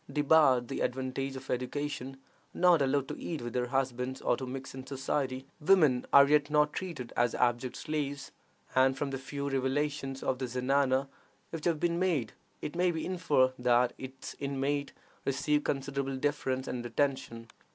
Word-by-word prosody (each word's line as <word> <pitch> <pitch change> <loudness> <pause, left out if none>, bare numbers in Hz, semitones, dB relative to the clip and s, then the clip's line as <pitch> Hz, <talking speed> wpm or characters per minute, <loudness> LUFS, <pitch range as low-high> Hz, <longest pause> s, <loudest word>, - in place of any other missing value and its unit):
Debarred 145 -4 +4
the - - -4
advantages 130 +1 -2
of 130 0 -8
education, 135 +1 -3 0.4
not 175 -3 +5
allowed 135 0 +1
to - - -6
eat 165 -3 -4
with 120 0 -6
their 125 -1 0
husbands 130 0 -1
or - - +1
to 130 +1 -6
mix 135 +1 -6
in 130 0 -7
society, 135 -1 -2
women 150 -7 +4
are 140 0 +8
yet 150 0 +3
not 150 0 +3
treated 165 -10 -5
as 120 -1 +2
abject 120 0 +1
slaves; 145 -3 -3 0.4
and 130 0 +4
from 140 0 -2
the 135 - -2
few 140 +2 -5
revelations 135 0 -1
of 130 - -1
the 130 - -2
zenana 130 +2 +1 0.4
which 165 -2 -5
have 165 -3 +1
been 170 +1 +1
made, 160 - 0 0.3
it 150 - -4
may 180 +1 +3
be 160 -2 -2
inferred 150 -8 +2
that 125 0 +3
its 130 0 -8
inmates 140 +1 -1 0.3
receive 145 +2 +1
considerable 135 0 -2
deference 130 -2 -1
and 120 -1 -3
attention. 120 -2 -2
135 Hz, 165 wpm, -31 LUFS, 130-145 Hz, 0.4 s, are